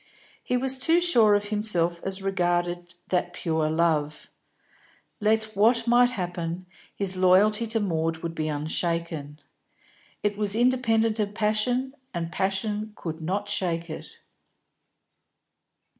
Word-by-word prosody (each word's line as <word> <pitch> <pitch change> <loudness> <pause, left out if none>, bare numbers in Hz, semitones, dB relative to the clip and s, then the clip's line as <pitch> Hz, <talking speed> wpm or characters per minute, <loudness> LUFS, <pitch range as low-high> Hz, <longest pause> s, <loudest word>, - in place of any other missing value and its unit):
He 250 - 0
was 265 +1 -1
too 330 +6 +4
sure 235 -13 +5
of 205 0 -1
himself 175 -6 0
as 195 0 -5
regarded 175 -2 -1
that 180 -1 0
purer 160 -3 -1
love; 155 -2 0 0.9
let 220 0 +1
what 230 +3 +3
might 245 +1 +5
happen, 175 -5 -4 0.3
his 190 -2 +3
loyalty 205 +5 +4
to 225 +1 +1
Maud 165 -5 -1
would 165 -1 -3
be 155 -1 -2
unshaken. 155 0 -2 0.8
It 210 0 -1
was 205 -1 0
independent 230 -2 +2
of 205 -1 -2
passion, 225 +5 0 0.2
and 170 -1 -3
passion 205 +3 -2
could 160 -1 -6
not 195 +5 -2
shake 170 -5 -1
it. - - -9
195 Hz, 125 wpm, -26 LUFS, 170-220 Hz, 0.9 s, sure